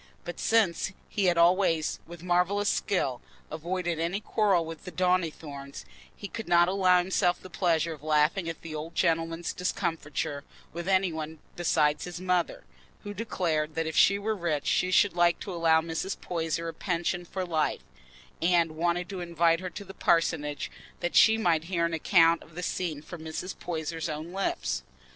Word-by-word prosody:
But 175 Hz, -, -6 dB
since 195 Hz, -4 st, +2 dB, 0.2 s
he 200 Hz, -, 0 dB
had 175 Hz, -2 st, +3 dB
always, 170 Hz, -2 st, +3 dB
with 170 Hz, 0 st, -10 dB
marvellous 180 Hz, +3 st, +2 dB
skill, 135 Hz, -10 st, 0 dB, 0.3 s
avoided 170 Hz, +1 st, -2 dB
any 170 Hz, +4 st, -1 dB
quarrel 205 Hz, -6 st, +2 dB
with 165 Hz, -1 st, -8 dB
Mr. 180 Hz, -, -9 dB
Donnithorne, 160 Hz, -6 st, -1 dB, 0.4 s
he 200 Hz, -, -7 dB
could 225 Hz, +2 st, -7 dB
not 175 Hz, 0 st, +5 dB
allow 185 Hz, -1 st, +4 dB
himself 180 Hz, 0 st, +1 dB
the 185 Hz, -, -12 dB
pleasure 165 Hz, -3 st, +1 dB
of 150 Hz, -, -12 dB
laughing 155 Hz, +4 st, +2 dB
at 165 Hz, -, -7 dB
the 160 Hz, -, -7 dB
old 155 Hz, +2 st, -6 dB
gentleman's 165 Hz, 0 st, 0 dB
discomfiture 155 Hz, -5 st, -2 dB, 0.3 s
with 170 Hz, +1 st, -5 dB
any 190 Hz, -2 st, +2 dB
one 160 Hz, 0 st, -5 dB, 0.2 s
besides 155 Hz, -3 st, +2 dB
his 175 Hz, -1 st, -6 dB
mother, 180 Hz, -1 st, 0 dB, 0.4 s
who 205 Hz, -1 st, -6 dB
declared 165 Hz, -8 st, -1 dB
that 165 Hz, 0 st, 0 dB
if 160 Hz, -1 st, -4 dB
she 200 Hz, -, +5 dB
were 215 Hz, +2 st, -1 dB
rich 165 Hz, -6 st, -1 dB
she 180 Hz, -, +2 dB
should 185 Hz, +1 st, +4 dB
like 175 Hz, 0 st, +3 dB
to 195 Hz, -, -5 dB
allow 165 Hz, -2 st, +4 dB
Mrs. 165 Hz, +4 st, -4 dB
Poyser 165 Hz, -1 st, -2 dB
a 165 Hz, -, -4 dB
pension 175 Hz, 0 st, -2 dB
for 185 Hz, +2 st, -4 dB
life, 155 Hz, -, 0 dB, 0.6 s
and 170 Hz, -1 st, +3 dB
wanted 175 Hz, +2 st, -1 dB
to 190 Hz, -3 st, -5 dB
invite 170 Hz, -1 st, +2 dB
her 185 Hz, 0 st, -5 dB
to 200 Hz, -, -8 dB
the 195 Hz, -, -10 dB
parsonage 160 Hz, -5 st, +1 dB, 0.3 s
that 175 Hz, 0 st, -2 dB
she 220 Hz, 0 st, +7 dB
might 165 Hz, -7 st, +1 dB
hear 170 Hz, -1 st, 0 dB
an 170 Hz, -, -2 dB
account 165 Hz, 0 st, +4 dB
of 160 Hz, -, -16 dB
the 180 Hz, -, -5 dB
scene 160 Hz, -5 st, -3 dB
from 175 Hz, -1 st, -9 dB
Mrs. 160 Hz, +4 st, -5 dB
Poyser's 165 Hz, -1 st, -3 dB
own 155 Hz, +2 st, -5 dB
lips. 195 Hz, 0 st, -1 dB
170 Hz, 175 wpm, -28 LUFS, 160-185 Hz, 0.6 s, she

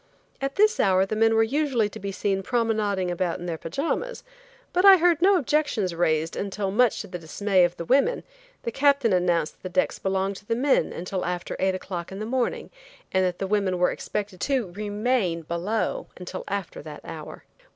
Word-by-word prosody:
At 275 Hz, 0 st, -2 dB
this 430 Hz, +2 st, +3 dB
hour 190 Hz, -1 st, +4 dB
the 205 Hz, -, -3 dB
men 225 Hz, +1 st, +3 dB
were 225 Hz, -, +5 dB
usually 265 Hz, -3 st, +1 dB
to -, -, -9 dB
be 200 Hz, 0 st, -4 dB
seen 195 Hz, 0 st, -1 dB
promenading 210 Hz, -4 st, 0 dB
about 175 Hz, -1 st, -1 dB
in 175 Hz, -, -8 dB
their 165 Hz, -2 st, -4 dB
pajamas, 330 Hz, -, -3 dB, 0.5 s
but 360 Hz, -, +2 dB
I 390 Hz, -1 st, +10 dB
heard 345 Hz, -1 st, +3 dB
no 390 Hz, +2 st, +6 dB
objections 285 Hz, -, 0 dB
raised 160 Hz, -1 st, 0 dB
until 200 Hz, 0 st, -2 dB
much 245 Hz, +3 st, +3 dB
to 205 Hz, -, -8 dB
the 180 Hz, -2 st, -6 dB
dismay 185 Hz, +3 st, +1 dB
of 175 Hz, 0 st, -3 dB
the 170 Hz, -, -5 dB
women 280 Hz, -, +2 dB, 0.4 s
the 235 Hz, -, -2 dB
Captain 275 Hz, -4 st, +3 dB
announced 175 Hz, -3 st, +1 dB
that -, -, -37 dB
the 230 Hz, -, +1 dB
decks -, -, 0 dB
belonged 190 Hz, 0 st, -1 dB
to 205 Hz, -, -15 dB
the 230 Hz, -, +1 dB
men 270 Hz, +3 st, +2 dB
until 180 Hz, +1 st, -4 dB
after 180 Hz, 0 st, -3 dB
eight 190 Hz, 0 st, +1 dB
o'clock 180 Hz, -2 st, -6 dB
in 190 Hz, -, -6 dB
the 215 Hz, -, -4 dB
morning, 250 Hz, +1 st, -2 dB, 0.4 s
and 190 Hz, 0 st, +2 dB
that 180 Hz, -1 st, 0 dB
the 195 Hz, -, -2 dB
women 195 Hz, -2 st, +1 dB
were 180 Hz, 0 st, +3 dB
expected 200 Hz, -3 st, -5 dB
to 255 Hz, -10 st, 0 dB
remain 205 Hz, -3 st, -1 dB
below 205 Hz, -, -2 dB
until -, -, -6 dB
after -, -, -4 dB
that -, -, -9 dB
hour. -, -, -9 dB
205 Hz, 200 wpm, -25 LUFS, 180-260 Hz, 0.5 s, I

